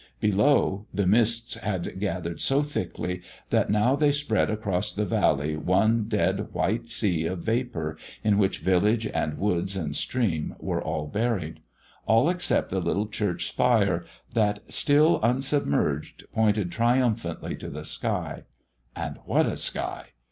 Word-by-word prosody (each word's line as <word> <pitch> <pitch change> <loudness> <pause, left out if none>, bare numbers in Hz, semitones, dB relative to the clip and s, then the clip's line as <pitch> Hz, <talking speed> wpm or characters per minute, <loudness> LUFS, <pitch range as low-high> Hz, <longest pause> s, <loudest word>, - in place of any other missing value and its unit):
Below, 105 -1 +2
the 100 - 0
mists 115 +3 +3
had 95 -3 -3
gathered 90 -4 -3
so 140 +2 +3
thickly 90 -9 -4 0.3
that - - +2
now 105 +6 +3
they 145 0 +3
spread 145 -6 +1
across 105 -2 -1
the 105 +1 -1
valley 75 -4 +1
one 100 +7 +2
dead 105 -1 0
white 115 +1 -1
sea 90 -8 0
of 90 -1 -4
vapour 110 -10 -2 0.3
in 105 -1 +3
which 95 -2 +2
village 105 +5 +2
and 75 -7 -2
woods 95 -1 -1
and 75 -5 -3
stream 95 -12 -1
were - - -2
all 75 - -2
buried 100 -2 -2 0.5
all 115 +9 +4
except 180 -1 0
the 95 - 0
little 105 +4 -1
church 105 -4 -1
spire, 100 -8 +2 0.3
that, 105 -2 +1
still 150 +3 +4
unsubmerged, 120 - 0
pointed 105 -4 +1
triumphantly 115 -7 0
to - - -7
the - - -7
sky; - - -3 0.5
and - - -5
what - - +3
a - - -1
sky! - - -3
105 Hz, 140 wpm, -26 LUFS, 90-115 Hz, 0.5 s, all